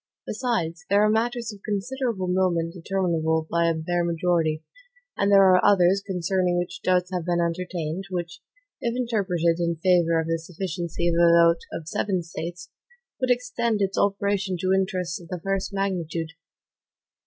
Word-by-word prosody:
Besides, 180 -9 -2
there 200 +2 +4
are 215 - +4
matters 235 0 -1
of 200 - -14
considerable 215 -1 -2
moment 180 -2 +1
determinable 165 -3 0
by 170 0 +2
a 165 - 0
bare 175 +2 -1
majority; 165 -2 0 0.5
and 200 - +1
there 195 -1 +7
are 185 -1 +5
others, 195 -1 +4
concerning 185 -1 0
which 175 0 -3
doubts 180 0 +1
have 180 -2 -1
been 175 0 0
entertained, 170 0 -2
which, 175 -2 -4 0.4
if 235 0 -1
interpreted 185 -9 0
in 170 -1 0
favor 170 -1 +3
of 160 - -1
the 165 0 -1
sufficiency 170 0 -4
of 170 - +2
a 170 - +6
vote 170 0 +5
of 160 - -6
seven 185 +1 -1
States, 175 +1 -7 0.5
would 255 - 0
extend 235 -3 0
its 195 -1 0
operation 200 -1 0
to 185 0 +2
interests 185 -2 -1
of 170 - -13
the 180 -1 -5
first 195 +3 -2
magnitude. 175 -5 -2
180 Hz, 160 wpm, -25 LUFS, 170-195 Hz, 0.5 s, there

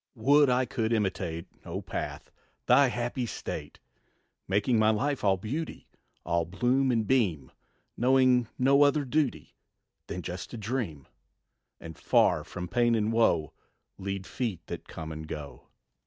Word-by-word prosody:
Would 140 +5 +4
I 125 +1 +2
could 120 -3 -2
imitate, 95 -6 -1 0.2
O - - -5
path, - - -6 0.3
thy 135 +3 +6
happy 120 0 -2
state! - - -6 0.7
Making 105 +4 +2
my 110 0 +4
life 135 +6 0
all 95 -2 +3
beauty, 140 - -5 0.4
All 85 0 +1
bloom 125 +10 +1
and 115 -3 +1
beam; 95 - +1 0.4
Knowing 125 -1 +4
no 135 +2 +4
other 145 0 +4
duty 145 0 -1 0.5
Than 90 - -5
just 90 +1 -6
to 120 - -7
dream, 105 - -4 0.7
And 80 -1 -9
far - - +3
from 90 0 -6
pain 120 +2 +2
and 110 0 0
woe 85 -10 +2 0.5
Lead 95 -1 -4
feet 110 -9 -4
that - - -7
come 80 -1 -7
and 80 0 -7
go. 70 -5 -8
115 Hz, 140 wpm, -28 LUFS, 90-130 Hz, 0.7 s, thy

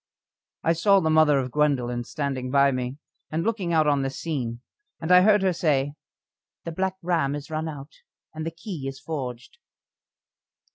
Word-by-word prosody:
I 165 - +3
saw 195 +4 +4
the 160 -3 +1
mother 155 -2 +5
of 130 -2 -2
Gwendoline 125 -5 +1
standing 135 -3 -3
by 140 +1 +4
me 130 +1 -3 0.3
and 160 +2 -1
looking 205 -6 -1
out 160 -2 +4
on 145 -2 +2
this 135 0 -3
scene, 125 -8 -3 0.4
and 160 +2 -2
I 180 0 +8
heard 210 0 +5
her 190 -1 +3
say: 145 -4 +1 0.7
"The 170 - -5
Black 190 +3 -1
Ram 165 -5 +1
is 145 +2 -8
run 155 +1 -2
out, 145 -1 -8 0.4
and 155 0 -5
the 165 - -2
key 165 -3 -7
is 135 0 -6
forged." 130 -5 -6
150 Hz, 175 wpm, -25 LUFS, 135-165 Hz, 0.7 s, I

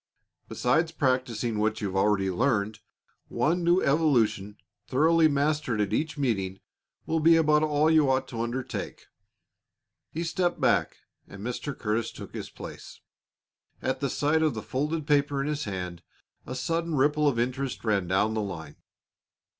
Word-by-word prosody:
Besides 160 +7 +1
practising 130 -6 0
what 110 +1 0
you've 100 -3 -3
already 95 -1 +2
learned, 110 -1 0 0.5
one 170 +3 0
new 175 +2 +3
evolution 115 -9 +2 0.3
thoroughly 160 +4 +4
mastered 145 -4 0
at 105 0 0
each 155 +6 -1
meeting 95 -9 -1 0.5
will 160 - 0
be 165 +1 +6
about 155 -2 +4
all 150 0 +2
you 155 -3 +4
ought 130 0 +1
to 115 -3 -4
undertake." 120 +2 -4 1.0
He 165 - -4
stepped 175 +1 -1
back, 100 -10 +2 0.3
and 100 +1 -10
Mr. 125 +4 -4
Curtis 110 +1 -1
took - - -10
his - - -6
place. - - -10 0.8
At 130 - -2
the 140 - -1
sight 150 +5 +1
of 155 -5 +1
the 110 - -5
folded 150 +3 -2
paper 145 -1 +2
in 135 - -1
his 150 -1 -2
hand 90 -3 -5 0.5
a 130 - -5
sudden 165 +4 -1
ripple 150 +2 +3
of 135 -5 +1
interest 125 +2 -2
ran 100 -5 +1
down 100 +4 +1
the 110 - -1
line. 80 -7 -6
130 Hz, 155 wpm, -27 LUFS, 110-155 Hz, 1.0 s, be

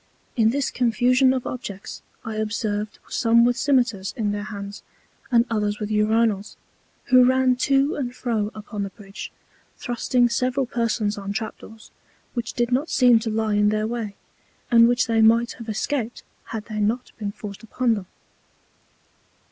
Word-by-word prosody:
In 225 -2 +4
this 275 +3 -1
Confusion 250 +2 +3
of 260 -2 -2
Objects, 200 -6 -6 0.2
I 220 -1 -4
observed 215 -1 -2
some 235 0 +3
with 245 0 +2
Scymetars 245 -8 +1
in 210 -3 0
their 205 0 -3
Hands, 200 -1 -7 0.5
and 235 -1 +5
others 210 -2 -1
with 210 0 -4
Urinals, 210 -1 +1 0.6
who 255 0 +8
ran 260 0 +4
to 275 +4 +2
and 250 -3 -4
fro 220 -5 -1
upon 210 -1 -6
the 200 - -2
Bridge, 195 -1 -10 0.5
thrusting 245 0 +1
several 255 +3 0
Persons 230 -3 -1
on 200 0 -4
Trap 220 +1 -4
doors 220 0 -14 0.4
which 240 -1 -3
did 240 0 0
not 275 +6 +1
seem 245 -3 +5
to 225 0 -3
lie 220 -1 0
in 210 0 +3
their 215 0 0
way, 220 -3 -4 0.6
and 230 -1 +7
which 245 +1 +2
they 225 -2 +2
might 230 +2 +4
have 230 -1 -8
escaped 235 +2 -2 0.2
had 220 -2 -6
they 215 -2 -5
not 225 +4 -1
been 205 -2 -3
forced 205 0 -9
upon 235 +1 0
them. 200 -4 -5
225 Hz, 165 wpm, -23 LUFS, 210-245 Hz, 0.6 s, who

